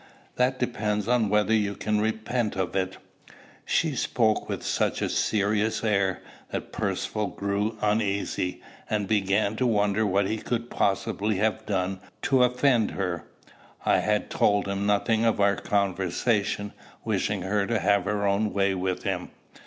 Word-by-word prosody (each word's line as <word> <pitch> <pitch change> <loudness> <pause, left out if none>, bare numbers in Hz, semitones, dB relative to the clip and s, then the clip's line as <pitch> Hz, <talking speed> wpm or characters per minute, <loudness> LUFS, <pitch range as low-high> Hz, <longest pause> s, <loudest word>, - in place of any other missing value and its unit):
That 125 +1 +2
depends 105 -4 -1
on 120 -3 +2
whether 105 +1 +2
you 105 -2 +1
can 105 +1 0
repent 110 +1 -1
of 95 -1 -2
it." 95 -1 -1 0.7
She 160 -4 +1
spoke 110 -3 +1
with - - -3
such - - 0
a - - 0
serious 105 +1 +1
air, 100 -4 +1 0.3
that - - -5
Percivale 105 -1 -2
grew 100 +2 -2
uneasy, 100 -3 0 0.3
and 105 -2 0
began 100 0 +1
to 130 - +2
wonder 105 -1 +2
what 100 -1 +2
he 110 - -1
could 120 +1 -3
possibly 100 +2 0
have 110 +2 0
done 95 -1 -1 0.2
to 130 -2 +4
offend 125 -2 +3
her. 90 -3 -3 0.6
I - - +4
had - - 0
told 100 -1 +2
him 100 +1 -1
nothing 110 +2 +2
of 115 -2 +2
our 100 0 +4
conversation, 100 +2 0 0.3
wishing - - -1
her 100 +1 0
to 115 - +1
have 100 -1 +2
her 105 0 0
own 100 +1 +1
way 100 -1 +2
with 90 -1 -2
him. 95 -3 -2
105 Hz, 155 wpm, -26 LUFS, 100-110 Hz, 0.7 s, to